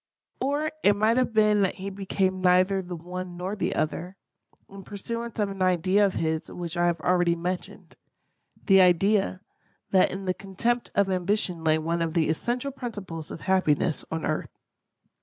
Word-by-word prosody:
Or 290 +4 0
it 205 - +5
might 220 +3 +2
have 255 -2 +2
been 215 -1 +4
that 190 - +1
he 195 +1 -6
became 190 -1 -1
neither 185 +1 +4
the 175 -1 -6
one 180 +1 -7
nor 185 +3 -3
the 205 - -2
other, 175 +5 -2 0.5
in 195 0 -11
pursuance 230 +4 -6
of 205 -2 0
an 195 -1 -7
idea 185 +2 +3
of 195 -2 +1
his 160 -1 -1
which 170 -2 -6
I 175 0 +2
have 170 -1 0
already 175 -1 +2
mentioned—the 185 +2 -2
idea, 190 +2 +3 0.5
that 190 -1 +5
in 195 +1 -6
the 185 - +1
contempt 230 +6 -2
of 200 -1 +2
ambition 185 -2 -1
lay 155 -1 +3
one 165 +2 -1
of 165 0 -2
the 160 -2 +2
essential 240 - -1
principles 205 - -7
of - - -8
happiness 180 -4 +1
on 160 0 -3
earth. 155 - -2
185 Hz, 170 wpm, -26 LUFS, 175-205 Hz, 0.5 s, it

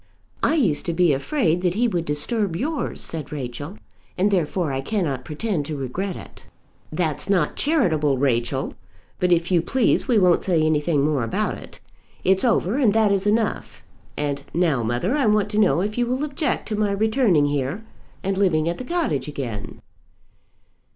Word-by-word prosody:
"I - - +2
used 195 - +1
to 170 - 0
be 170 -2 +3
afraid 175 - 0
that 180 -1 0
he 240 +3 +2
would 175 -7 -1
disturb 175 +6 -1
yours," 295 - -3
said 155 -3 -4
Rachel, 145 - -6 0.4
"and 200 +3 +2
therefore 170 -4 0
I 135 - -1
cannot 140 - -2
pretend 155 -1 -3
to 155 -2 -4
regret 175 +9 -3
it." - - -12 0.4
"That's 155 +2 -1
not 195 -3 +2
charitable, 160 - +1
Rachel. 130 0 0 0.5
But 180 0 +1
if 175 +1 +2
you 175 -2 +4
please 255 - +1
we 245 -4 +3
won't 180 -4 +4
say 170 -4 +2
anything 150 -1 +2
more 150 -5 +1
about 115 - -2
it. - - -12 0.4
It's 190 0 +3
over, 230 -2 +2
and 230 -8 +4
that 220 -2 +3
is 200 0 +1
enough. 215 +1 -1 0.3
And 145 -1 -2
now, 165 -7 +2
mother, 120 - 0
I 280 -6 +2
want 210 -1 +2
to 210 - +1
know 200 -4 +3
if 210 +4 -2
you 240 - +1
will 255 +3 -1
object 295 -1 -2
to 215 - -1
my 210 -1 +1
returning 215 - +2
here 145 +7 -2 0.4
and 195 0 -1
living 165 -5 +2
at 170 - -2
the - - -4
cottage 250 - -1
again." 120 -8 -6
180 Hz, 180 wpm, -23 LUFS, 150-215 Hz, 0.5 s, you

